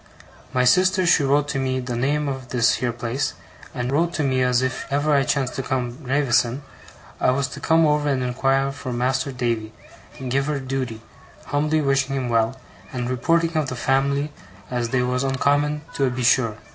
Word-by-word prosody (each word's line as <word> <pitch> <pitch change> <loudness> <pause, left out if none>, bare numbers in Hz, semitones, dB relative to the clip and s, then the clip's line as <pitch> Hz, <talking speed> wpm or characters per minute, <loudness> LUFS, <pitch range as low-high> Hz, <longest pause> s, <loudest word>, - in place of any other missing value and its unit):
My 125 - +2
sister 185 +6 +4
she 170 - +5
wrote 140 +1 +2
to 135 - -1
me 130 -1 -1
the 125 -1 -4
name 145 +5 0
of 130 -2 -4
this 120 -1 +2
here 120 -1 -1
place, 120 +3 -3 0.4
and 125 +1 -3
wrote 170 +5 +1
to 155 - 0
me 130 -2 +1
as 125 0 +2
if 130 -2 -3
ever 145 +2 +2
I 140 - +4
chanced 135 -1 0
to - - 0
come 130 -2 -2
to 135 +6 -14
Gravesen', 130 -1 +1 0.6
I - - +3
was 135 +2 +1
to 140 - -8
come 160 +2 +3
over 150 -1 +2
and 130 -2 0
inquire 135 +2 +1
for 135 -2 -6
Mas'r 130 +3 0
Davy 115 -4 -2 0.5
and 130 -1 -5
give 135 +2 +1
her 150 -2 -1
dooty, 130 -4 -4 0.4
humbly 150 +2 +1
wishing 135 -1 +1
him 130 -2 -2
well 115 +3 +1 0.3
and 125 -1 -3
reporting 165 +6 +1
of 155 -3 0
the 130 - -4
fam'ly 140 +3 +1 0.4
as 120 -2 -1
they 125 0 +1
was 125 +1 0
oncommon 145 +2 +1
toe 135 -2 +1
be 125 0 -3
sure. 115 -3 +3
135 Hz, 195 wpm, -23 LUFS, 125-145 Hz, 0.6 s, she